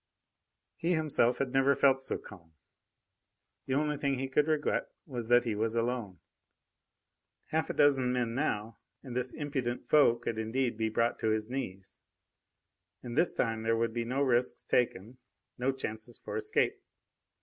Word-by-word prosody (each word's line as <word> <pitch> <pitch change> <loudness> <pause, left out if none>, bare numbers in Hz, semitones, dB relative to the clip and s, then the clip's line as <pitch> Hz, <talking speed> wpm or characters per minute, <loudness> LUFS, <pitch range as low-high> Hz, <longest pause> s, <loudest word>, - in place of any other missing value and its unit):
He 170 +2 +1
himself 135 -6 +2
had 135 -2 -2
never 135 +1 +4
felt 135 -1 +4
so 135 - -2
calm. 85 -5 -14 1.1
The 130 - 0
only 150 +1 +1
thing 140 -2 0
he 135 +1 -2
could 150 +3 +2
regret 155 -2 0 0.2
was 120 -6 -5
that 120 +1 +5
he 115 - 0
was 110 +2 -1
alone. 115 -5 -1 1.3
Half 160 -1 0
a - - -1
dozen 135 -3 +4
men 120 -2 0
now, 115 -5 -2 0.2
and 125 -3 -7
this 125 0 -1
impudent 135 -5 -3
foe 145 -6 +5
could 115 -1 -4
indeed 120 +2 -1
be 110 0 0
brought 115 +2 0
to 110 - 0
his 110 +1 -1
knees. 95 -7 -5 1.0
And 120 -1 -6
this 165 +4 +3
time 115 -1 -1
there 115 0 +1
would 115 0 0
be 120 0 -1
no 130 +4 0
risks 125 -2 +1
taken, 120 0 0 0.4
no 130 +2 +2
chances 115 -3 -6
for - - -7
escape. 435 0 0
125 Hz, 160 wpm, -31 LUFS, 115-135 Hz, 1.3 s, that